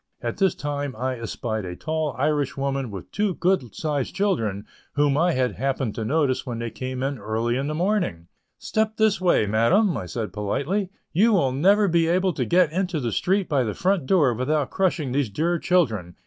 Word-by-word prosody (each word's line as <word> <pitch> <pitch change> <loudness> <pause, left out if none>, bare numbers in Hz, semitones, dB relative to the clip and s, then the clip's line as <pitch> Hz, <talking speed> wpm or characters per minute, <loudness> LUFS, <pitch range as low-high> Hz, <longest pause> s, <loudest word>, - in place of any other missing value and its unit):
At - - -3
this 190 -3 +2
time 145 -2 -3
I 130 +2 -3
espied 110 0 -3
a 90 -1 -6
tall 155 - -2
Irish 145 0 0
woman 135 -2 -2
with 95 -4 -9
two 205 -3 0
good 170 - 0
sized 150 -1 -2
children 115 - 0 0.3
whom 145 -1 +2
I 170 +3 +2
had 130 -3 +1
happened 135 -3 -1
to 115 - -4
notice 140 +1 +1
when 120 -3 -5
they 115 0 -4
came 130 0 -4
in 135 -1 -2
early 110 +3 -1
in 135 +2 -1
the 155 - -2
morning. 175 - 0 0.3
"Step 220 0 -1
this 220 -3 +2
way, 175 -11 +3
madam," 145 - +3
said 110 +2 -4
I - - -26
politely, 140 - -1 0.2
"you 215 +7 +4
will 140 -10 +3
never 200 +10 +4
be 170 -2 +2
able 185 +2 +2
to - - -1
get 175 -3 +3
into 180 -1 -1
the 120 -4 -2
street 190 - +1
by 140 -4 +1
the 105 -3 -3
front 185 -6 0
door 150 -10 +4
without 130 +3 -1
crushing 175 -8 0
these 135 -3 0
dear 170 +9 0
children. 110 - +1
145 Hz, 200 wpm, -24 LUFS, 120-180 Hz, 0.3 s, you